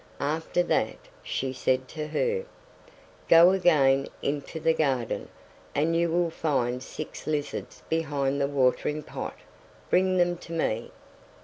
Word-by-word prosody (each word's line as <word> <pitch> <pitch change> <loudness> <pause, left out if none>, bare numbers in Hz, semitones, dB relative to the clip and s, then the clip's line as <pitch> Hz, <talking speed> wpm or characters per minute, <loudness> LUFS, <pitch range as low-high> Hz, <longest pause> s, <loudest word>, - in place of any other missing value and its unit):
After 160 +4 0
that, - - 0 0.2
she 130 0 -3
said 130 0 0
to 155 -2 -5
her: 475 - 0 0.8
"Go 170 +2 +8
again 145 -8 +4 0.2
into 145 +3 -3
the 160 +1 +3
garden, 135 -7 -1 0.5
and 160 +3 +2
you 170 0 +2
will 170 0 +1
find 125 -6 0
six 155 +3 -8
lizards 150 -2 -3
behind 140 -3 0
the 140 - +2
watering 140 +2 +1
pot, - - -6 0.5
bring 185 0 +3
them 175 0 +2
to 170 - -10
me." 120 -8 -1
155 Hz, 130 wpm, -27 LUFS, 135-170 Hz, 0.8 s, Go